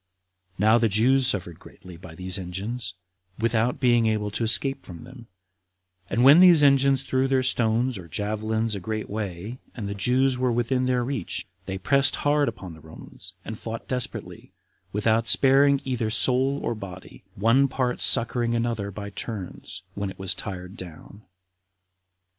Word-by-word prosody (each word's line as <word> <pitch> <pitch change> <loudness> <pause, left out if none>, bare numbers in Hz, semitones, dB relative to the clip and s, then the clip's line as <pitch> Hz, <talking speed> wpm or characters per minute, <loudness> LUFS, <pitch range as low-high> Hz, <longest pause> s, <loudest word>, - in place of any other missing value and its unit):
Now 110 +4 +4
the 115 -1 +2
Jews 125 +6 +3
suffered 90 -8 -1
greatly 90 -1 -14
by 80 -1 -12
these 95 +2 -1
engines, 95 +3 -5 0.4
without 115 +1 0
being 120 -3 +3
able 105 -1 -1
to 115 - -3
escape 135 +5 +3
from 85 -3 -11
them; 120 -3 -13 0.8
and 115 +5 +1
when 140 +5 +8
these 175 -4 +7
engines 135 -1 +4
threw 130 0 0
their 135 -1 +1
stones 120 -2 +1
or 85 - -11
javelins 110 +4 -2
a 100 - -3
great 110 +3 -4
way, 105 +3 -5 0.2
and 110 -5 -5
the 100 - -3
Jews 125 +6 +1
were 130 -1 +1
within 120 +2 0
their 125 -1 +1
reach, 125 -7 -3 0.2
they 95 0 -3
pressed 135 +8 +3
hard 145 0 +1
upon 95 -6 -9
the 80 - -13
Romans, 90 +4 -11
and 110 -1 -7
fought 115 0 -7
desperately, 125 -2 -5 0.4
without 110 +3 +1
sparing 140 +1 +4
either 125 -4 -2
soul 130 +6 +1
or - - -1
body, 95 -4 -10
one 115 +7 +3
part 130 -2 -2
succoring 120 0 +1
another 115 -4 -2
by 100 +1 -7
turns, 95 -4 -6
when 100 0 -4
it - - -10
was 95 -1 0
tired 90 -1 -7
down. 90 +4 -11
115 Hz, 160 wpm, -25 LUFS, 100-130 Hz, 0.8 s, when